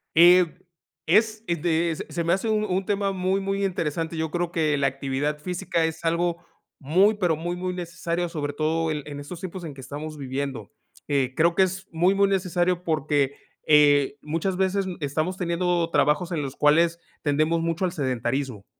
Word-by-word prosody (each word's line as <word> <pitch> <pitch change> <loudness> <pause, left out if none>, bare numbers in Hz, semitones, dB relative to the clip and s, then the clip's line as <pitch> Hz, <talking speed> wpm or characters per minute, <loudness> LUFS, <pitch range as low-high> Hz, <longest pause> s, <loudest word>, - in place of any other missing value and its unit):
Eh, 175 +2 +8 0.6
es, 215 +5 +2
eh, 170 - +1
de 165 0 0
se - - -6
se 170 - -2
me 170 +1 +2
hace 195 +4 -1
un 215 -1 +1
un 190 -1 -1
tema 200 -1 0
muy 190 +1 0
muy 195 0 -2
interesante. 165 -2 -2
Yo 160 -1 -2
creo 175 0 -1
que 155 -3 +1
la 140 -1 +2
actividad 135 +2 -2
física 175 0 -1
es 160 +1 -4
algo 170 +1 +1 0.4
muy 185 +10 +3
pero 180 -6 +1
muy, 175 +3 -3
muy 180 0 -3
necesario, 170 0 -3
sobre 145 -3 -3
todo 160 +2 0
en 150 -2 -3
en 145 -1 -7
estos 145 +4 -8
tiempos 185 0 -7
en 155 -3 -6
que 135 - -11
estamos 150 +3 -7
viviendo, 135 -4 -4 0.4
eh, 135 -3 0
creo 170 +1 +3
que 190 - +5
es 190 0 -3
muy, 175 +4 +3
muy 200 0 +3
necesario 180 -2 0
porque, 145 -4 0 0.3
eh, 145 -2 +5
muchas 165 +5 -2
veces 190 +1 +1
n 185 -2 -5
estamos 155 +5 -2
teniendo 175 -1 0
trabajos 160 +4 +2
en 165 -3 -1
los 135 -1 -5
cuales 165 +3 +3 0.2
tendemos 155 +3 +1
mucho 165 +3 -1
al 180 - -1
sedentarismo. 130 - -2
165 Hz, 190 wpm, -25 LUFS, 150-180 Hz, 0.6 s, Eh